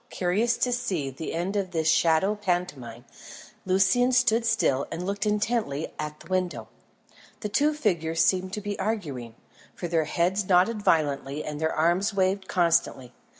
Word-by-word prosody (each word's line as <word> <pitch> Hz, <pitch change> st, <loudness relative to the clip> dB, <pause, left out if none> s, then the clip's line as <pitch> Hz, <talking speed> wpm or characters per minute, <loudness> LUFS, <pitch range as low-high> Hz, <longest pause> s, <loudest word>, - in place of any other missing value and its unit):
Curious 210 Hz, +6 st, 0 dB
to 250 Hz, -, 0 dB
see 185 Hz, -, -2 dB
the 145 Hz, +5 st, -6 dB
end 180 Hz, +4 st, -2 dB
of 195 Hz, -2 st, -1 dB
this 160 Hz, -3 st, -1 dB
shadow 165 Hz, +5 st, +3 dB
pantomime, 175 Hz, -, -3 dB, 0.6 s
Lucian 195 Hz, +7 st, +3 dB
stood 240 Hz, -2 st, +3 dB
still 140 Hz, -11 st, +1 dB
and 170 Hz, +2 st, -4 dB
looked 200 Hz, +2 st, -2 dB
intently 210 Hz, -8 st, -1 dB
at 150 Hz, 0 st, -5 dB
the 155 Hz, -, -14 dB
window. 185 Hz, -1 st, -2 dB, 0.7 s
The 210 Hz, -, -3 dB
two 295 Hz, +8 st, +2 dB
figures 165 Hz, -, +1 dB
seemed 185 Hz, 0 st, +1 dB
to 210 Hz, -, -3 dB
be 205 Hz, 0 st, -5 dB
arguing, 145 Hz, -, -3 dB, 0.4 s
for 175 Hz, -, -4 dB
their 165 Hz, -2 st, +1 dB
heads 185 Hz, +5 st, 0 dB
nodded 195 Hz, +4 st, +3 dB
violently 145 Hz, -4 st, 0 dB
and 150 Hz, 0 st, -6 dB
their 160 Hz, 0 st, +1 dB
arms 180 Hz, +6 st, +1 dB
waved 190 Hz, 0 st, 0 dB
constantly. 165 Hz, -8 st, +1 dB
185 Hz, 155 wpm, -26 LUFS, 160-210 Hz, 0.7 s, shadow